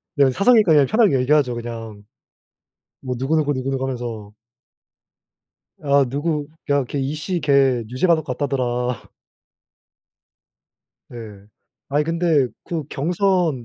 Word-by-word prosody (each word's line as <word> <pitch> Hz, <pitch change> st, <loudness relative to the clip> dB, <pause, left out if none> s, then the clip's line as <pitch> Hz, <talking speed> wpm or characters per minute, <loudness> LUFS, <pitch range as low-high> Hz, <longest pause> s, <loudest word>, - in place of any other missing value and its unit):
네 140 Hz, -3 st, +4 dB
사석이니까 205 Hz, -, +4 dB
그냥 145 Hz, -2 st, +5 dB
편하게 215 Hz, -, +3 dB
얘기하죠. 135 Hz, -1 st, +2 dB
그냥. 115 Hz, -3 st, -7 dB, 1.0 s
뭐 130 Hz, -1 st, -3 dB
누구 135 Hz, +5 st, 0 dB
누구 150 Hz, -2 st, +1 dB
누구누구 135 Hz, 0 st, -3 dB
하면서. 120 Hz, -5 st, -5 dB, 1.5 s
아 140 Hz, -1 st, +3 dB
누구 145 Hz, +2 st, -2 dB, 0.2 s
"야 140 Hz, 0 st, +3 dB
걔 140 Hz, -, -5 dB
이씨 155 Hz, +6 st, -3 dB
걔 135 Hz, -5 st, +2 dB
유죄 130 Hz, +9 st, 0 dB
받을 165 Hz, -3 st, +3 dB
것 125 Hz, -4 st, -4 dB
같다더라." 125 Hz, -3 st, -2 dB, 2.0 s
네. 105 Hz, -4 st, -10 dB, 0.4 s
"아니 145 Hz, +2 st, +1 dB
근데 165 Hz, -4 st, +1 dB, 0.2 s
그 165 Hz, -2 st, -3 dB
경선 175 Hz, -3 st, 0 dB
140 Hz, 240 characters per minute, -21 LUFS, 125-155 Hz, 2.0 s, 그냥